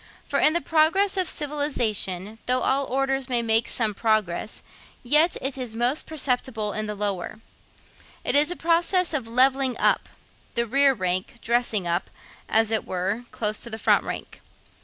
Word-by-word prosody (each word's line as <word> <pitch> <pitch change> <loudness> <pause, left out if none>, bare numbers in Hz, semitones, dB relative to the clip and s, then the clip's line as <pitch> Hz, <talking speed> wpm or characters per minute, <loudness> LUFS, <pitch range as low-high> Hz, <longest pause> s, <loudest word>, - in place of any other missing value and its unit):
For - - 0
in 305 - +5
the 340 - 0
progress 330 +6 +2
of 370 -3 +2
civilisation, 225 - -2
though 255 +1 +2
all 275 +1 +1
orders 270 0 -1
may 240 -2 +1
make 225 0 +2
some 220 -3 0
progress, 215 -2 -1 0.4
yet 300 +7 +4
it 270 0 -3
is 240 -3 -5
most 245 +5 0
perceptible 250 -7 -1
in 215 0 -3
the 210 - -4
lower. 200 0 -3 0.9
It - - +1
is 295 +2 +4
a 355 - -1
process 340 +2 +2
of 265 -7 -2
'levelling 260 +1 +2
up;' - - +1 0.5
the 235 - +1
rear 275 +3 +3
rank 185 +2 -1
'dressing 230 -6 0
up,' 170 +2 -1 0.4
as 225 0 +3
it 220 - 0
were, 195 +6 -3
close 215 -1 -2
to 235 - -4
the 220 - -5
front - - +3
rank. - - -7
240 Hz, 165 wpm, -24 LUFS, 215-280 Hz, 0.9 s, in